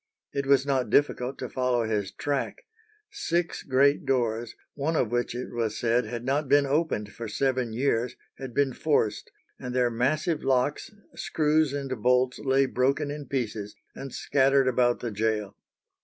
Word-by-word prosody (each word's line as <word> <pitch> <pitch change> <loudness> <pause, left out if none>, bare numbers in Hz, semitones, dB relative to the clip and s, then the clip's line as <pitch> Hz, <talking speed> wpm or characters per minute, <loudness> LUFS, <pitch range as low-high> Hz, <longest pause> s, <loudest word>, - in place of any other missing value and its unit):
It 140 -1 -2
was 140 -1 +4
not 135 -3 0
difficult 135 -2 +1
to - - -4
follow 125 -2 0
his 105 -3 -1
track. 145 -2 -3 0.5
Six 170 0 -1
great 140 +2 +3
doors, 120 -3 -1 0.2
one 150 +3 -1
of 120 -7 +1
which 120 0 -1
it 125 0 -5
was 115 -3 -1
said 120 +1 +1
had 120 +2 -5
not 140 +1 0
been 145 0 +5
opened 140 -8 -1
for 115 - -6
seven 130 +1 0
years, 120 0 0 0.2
had 130 -2 -6
been 140 -2 +2
forced, 130 -9 0 0.3
and 125 0 -5
their 125 -1 +2
massive 150 +7 0
locks, 130 +2 +1 0.2
screws, 155 -1 +1
and 135 -5 -4
bolts 125 +2 +2
lay 135 0 +2
broken 135 +3 0
in 145 -2 -7
pieces, 110 -6 -3 0.2
and 135 -1 -8
scattered 135 0 +2
about 120 -1 +2
the 120 - -3
gaol. 105 -1 -1
130 Hz, 160 wpm, -27 LUFS, 120-140 Hz, 0.5 s, been